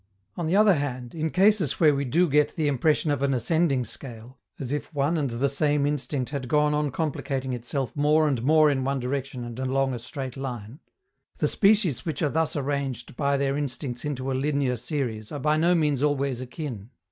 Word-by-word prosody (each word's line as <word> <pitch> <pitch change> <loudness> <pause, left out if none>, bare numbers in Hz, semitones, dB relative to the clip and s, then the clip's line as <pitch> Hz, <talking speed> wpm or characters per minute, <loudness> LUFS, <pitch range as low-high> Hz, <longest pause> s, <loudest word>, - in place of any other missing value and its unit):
On 170 -2 -3
the 170 - +1
other 210 -1 +6
hand, 130 -5 -3
in 160 0 -2
cases 195 - +3
where 155 -3 +5
we 140 0 -1
do 170 +8 +2
get 150 0 +2
the 155 -2 0
impression 150 +3 +1
of 145 - -1
an 140 -1 +1
ascending 140 0 +1
scale, 120 +1 -10 0.2
as 130 -2 -4
if 145 +3 -3
one 145 +4 +1
and 145 -4 0
the 120 +4 0
same 145 +1 +2
instinct 145 -2 -2
had 140 -4 -4
gone 150 +2 +2
on 150 0 0
complicating 135 -3 -2
itself 125 +2 -4
more 150 +2 +3
and 135 -6 0
more 155 +3 +5
in 135 -2 -1
one 135 +1 -1
direction 130 0 -3
and 120 +1 -7
along 135 0 0
a 120 - -4
straight 130 +1 -6
line, 125 -2 -6 0.6
the - - +1
species 200 - +3
which 165 0 -3
are 150 - +2
thus 160 +1 0
arranged 140 -4 -3
by 140 0 +1
their 135 0 0
instincts 135 -3 -3
into 135 -2 -3
a - - 0
linear 135 -1 0
series 120 -5 -4
are 150 - -4
by 150 +2 +2
no 170 +3 +3
means 150 -5 +1
always 140 -3 0
akin. 125 - -6
140 Hz, 205 wpm, -26 LUFS, 130-150 Hz, 0.6 s, other